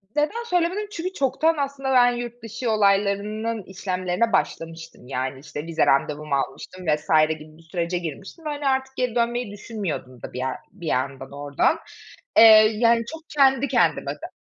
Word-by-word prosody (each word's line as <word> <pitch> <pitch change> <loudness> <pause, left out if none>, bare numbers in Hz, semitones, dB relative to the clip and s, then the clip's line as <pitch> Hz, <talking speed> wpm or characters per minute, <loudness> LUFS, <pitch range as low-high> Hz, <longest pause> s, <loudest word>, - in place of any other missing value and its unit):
neden 310 +11 0
söylemedim? 360 +2 0
Çünkü 370 -1 -4
çoktan 315 +4 +1
aslında 275 -1 -2
ben 245 -1 +6
yurt 240 0 -6
dışı 225 +1 -3
olaylarının 210 +1 +1
işlemlerine 185 +3 -2
başlamıştım. 165 -8 -3
Yani, 130 0 -3
işte 145 +2 -7
vize 165 -1 +1
randevumu 145 +1 +1
almıştım 180 +6 -4
vs. 150 -1 0 0.2
gibi 155 0 -6
bir - - -17
sürece 175 0 -1
girmiştim 185 - -7
ve - - -2
hani 290 -1 -3
artık 265 0 0
geri 250 -2 -1
dönmeyi 235 -2 0
düşünmüyordum 195 - -6
da - - -8
bir - - -6
yer 130 0 -2
bir 175 -4 -9
yandan 135 0 -2
oradan. 145 - 0 0.6
Eee, - - +10 0.3
yani 230 +1 +3
çok 320 - -7
kendi 275 -1 +3
kendime - - +2
de - - -9
205 Hz, 160 wpm, -24 LUFS, -, 0.6 s, Eee